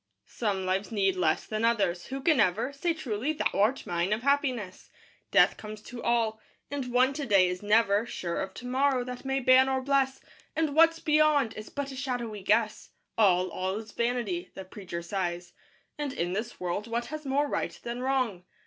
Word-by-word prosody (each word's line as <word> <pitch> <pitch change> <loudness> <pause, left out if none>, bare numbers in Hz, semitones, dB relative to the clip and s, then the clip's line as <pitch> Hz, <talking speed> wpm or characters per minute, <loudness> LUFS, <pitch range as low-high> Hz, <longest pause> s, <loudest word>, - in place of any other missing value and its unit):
II - - -53
Some 200 -5 -2
lives 190 +4 -1
need 195 -3 +1
less 165 -4 +1
than 215 0 -3
others. 205 -7 +1
Who 270 +1 -5
can 305 -1 +3
ever 220 +6 +2
Say 335 +5 0
truly 255 0 -2
"Thou 310 - 0
art 215 +7 +1
mine," 175 +3 0
of 220 +3 -3
Happiness? 255 -9 -1 0.4
Death - - +4
comes 215 0 -8
to 245 -1 -8
all. 230 -2 +1 0.3
And 270 -3 -3
one, 255 +2 +3
to 290 0 -4
day, 195 -4 +5
is 180 0 -3
never 210 +1 +3
Sure 170 -6 -3
of 190 - -4
to 245 - -9
morrow, 260 0 +1
that 250 +1 -7
may 270 0 0
ban 260 +1 +6
or 265 0 +1
bless; 270 0 +1 0.4
And 315 -2 0
what's 330 +2 +5
beyond 300 -6 +3
is 215 - -9
but 285 -1 -4
a - - -8
shadowy 245 -6 -3
guess. 215 +3 +1 0.3
"All, 185 -4 +3
all 185 +1 -2
is 220 -1 -8
vanity," 245 - -2
the 190 - -7
preacher 180 -3 -7
sighs; 175 -1 -3 0.5
And 290 -2 -2
in 175 +1 -2
this 215 +4 -4
world 180 +4 -3
what 235 +1 -2
has 310 0 -5
more 285 +1 +1
right - - -3
than 240 +1 -4
Wrong? 255 -8 0
235 Hz, 195 wpm, -28 LUFS, 195-270 Hz, 0.5 s, ban